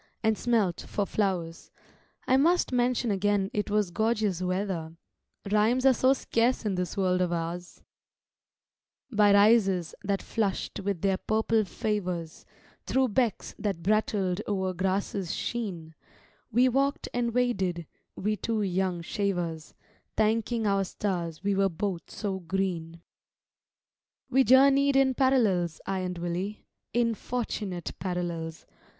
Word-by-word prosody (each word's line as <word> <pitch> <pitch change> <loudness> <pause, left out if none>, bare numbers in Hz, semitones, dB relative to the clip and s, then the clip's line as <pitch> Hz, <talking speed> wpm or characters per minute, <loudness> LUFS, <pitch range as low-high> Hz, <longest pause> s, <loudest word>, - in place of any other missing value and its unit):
and 220 0 +3
smelt 215 -7 0
for 205 - -1
flowers: 180 -6 -2 0.6
I 260 - +3
must 330 +5 +3
mention 245 -2 +1
again 200 0 +1
it 210 0 -1
was 210 -3 +1
gorgeous 215 -3 0
weather, 180 -3 -2 0.5
Rhymes 225 +5 +3
are 265 - +7
so 255 +2 +4
scarce 240 -2 0
in 205 - 0
this 180 +1 -3
world 185 -1 +2
of 180 -1 +1
ours:— 170 +1 -4 1.3
By 210 -2 +5
rises 200 -4 +4
that 200 -1 -1
flush'd 205 -4 -2
with 195 -3 -2
their 195 -1 +2
purple 220 +1 +1
favours, 185 -6 -3 0.4
Thro' 260 -1 +1
becks 230 -1 0
that 195 -6 -2
brattled 200 -2 +1
o'er 190 -2 -1
grasses 190 0 -1
sheen, 185 -9 -4 0.6
We 245 +3 +4
walked 275 +3 0
and 240 -1 0
waded, 195 -9 0 0.3
we 210 +2 -1
two 220 +2 -1
young 185 -2 -1
shavers, 175 -5 -3 0.4
Thanking 225 +1 +1
our 195 -1 +2
stars 175 -4 -3
we 200 0 +1
were 195 0 +2
both 180 0 -4
so 195 -3 -3
green. 170 -2 -3 1.3
We 265 +1 +5
journeyed 275 +3 +5
in 270 -1 +4
parallels, 215 - +2
I 195 -1 -1
and 180 -1 -3
Willie, 175 +4 -4 0.3
In 235 -1 +2
fortunate 210 -7 -4
parallels! 170 -3 -4
200 Hz, 130 wpm, -28 LUFS, 180-230 Hz, 1.3 s, are